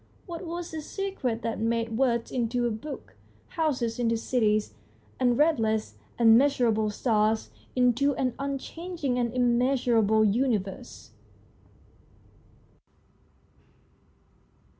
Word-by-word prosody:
What 340 Hz, -1 st, -7 dB
was 345 Hz, 0 st, -5 dB
this 315 Hz, -2 st, -7 dB
secret 295 Hz, -, -3 dB
that 230 Hz, -, -2 dB
made 230 Hz, 0 st, -1 dB
words 235 Hz, -2 st, +1 dB
into 245 Hz, 0 st, 0 dB
a 240 Hz, -, 0 dB
book, 275 Hz, +7 st, -8 dB, 0.3 s
houses 260 Hz, -9 st, -1 dB
into 230 Hz, -1 st, +1 dB
cities, 215 Hz, -, 0 dB, 0.5 s
and 245 Hz, -2 st, +2 dB
restless 225 Hz, -9 st, +1 dB, 0.2 s
and 225 Hz, -1 st, +6 dB
measurable 240 Hz, -6 st, +2 dB
stars 215 Hz, 0 st, 0 dB, 0.2 s
into 250 Hz, +3 st, +2 dB
an 255 Hz, -2 st, -1 dB
unchanging 280 Hz, 0 st, -3 dB
and 235 Hz, -1 st, 0 dB
immeasurable 240 Hz, -3 st, +2 dB
universe 215 Hz, -1 st, -2 dB
245 Hz, 95 wpm, -27 LUFS, 225-275 Hz, 0.5 s, and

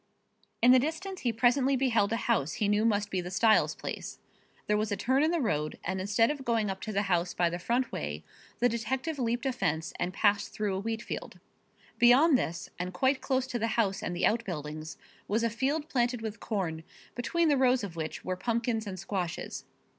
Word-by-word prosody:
In 245 Hz, -, +8 dB
the 255 Hz, -, +7 dB
distance 325 Hz, +7 st, -3 dB
he 240 Hz, -, +1 dB
presently 255 Hz, +4 st, +3 dB
beheld 235 Hz, -6 st, +2 dB
a -, -, +2 dB
house 205 Hz, -, 0 dB
he 210 Hz, -, 0 dB
knew 210 Hz, +2 st, +2 dB
must 205 Hz, -2 st, +1 dB
be 185 Hz, -, 0 dB
the 180 Hz, -, -6 dB
Styles 215 Hz, +4 st, +3 dB
place. -, -, -6 dB, 0.5 s
There 210 Hz, -, +2 dB
was 215 Hz, 0 st, 0 dB
a 205 Hz, -, 0 dB
turn 260 Hz, +3 st, +2 dB
in 310 Hz, -, +3 dB
the 340 Hz, 0 st, +1 dB
road 155 Hz, -, -1 dB
and 185 Hz, +2 st, -2 dB
instead 210 Hz, +5 st, +2 dB
of 285 Hz, -3 st, -5 dB
going 225 Hz, -5 st, +1 dB
up 190 Hz, -, -7 dB
to 220 Hz, -, -4 dB
the 200 Hz, 0 st, +1 dB
house 175 Hz, -2 st, 0 dB
by 175 Hz, -1 st, +2 dB
the 175 Hz, -, -3 dB
front 240 Hz, +6 st, 0 dB
way 75 Hz, +1 st, -4 dB, 0.3 s
the 245 Hz, -, +3 dB
detective 260 Hz, +6 st, -2 dB
leaped 240 Hz, +1 st, -1 dB
a 265 Hz, -, +1 dB
fence 160 Hz, -9 st, -1 dB
and 180 Hz, -, -1 dB
passed 205 Hz, +1 st, +2 dB
through 210 Hz, -2 st, -1 dB
a 190 Hz, -, -1 dB
wheatfield. 225 Hz, +2 st, -5 dB, 0.6 s
Beyond 265 Hz, +6 st, +6 dB
this, 170 Hz, -8 st, -2 dB
and 180 Hz, 0 st, -4 dB
quite 260 Hz, +7 st, +2 dB
close 260 Hz, -1 st, 0 dB
to 250 Hz, -2 st, -3 dB
the 225 Hz, -, 0 dB
house 195 Hz, -4 st, +1 dB
and 175 Hz, -, -3 dB
the 175 Hz, -, +1 dB
out 230 Hz, +2 st, +2 dB
buildings, 155 Hz, -4 st, -6 dB, 0.3 s
was 220 Hz, +3 st, +1 dB
a 230 Hz, -, +1 dB
field 280 Hz, +7 st, -1 dB
planted 245 Hz, -3 st, 0 dB
with 220 Hz, 0 st, -5 dB
corn, 170 Hz, -7 st, -3 dB, 0.3 s
between 335 Hz, +7 st, 0 dB
the 295 Hz, -, +4 dB
rows 255 Hz, -2 st, +3 dB
of 185 Hz, -5 st, -6 dB
which 160 Hz, -1 st, -5 dB
were 185 Hz, -, -1 dB
pumpkins 230 Hz, +2 st, -1 dB
and 190 Hz, -2 st, -5 dB
squashes. 180 Hz, -2 st, -4 dB
225 Hz, 215 wpm, -29 LUFS, 190-255 Hz, 0.6 s, In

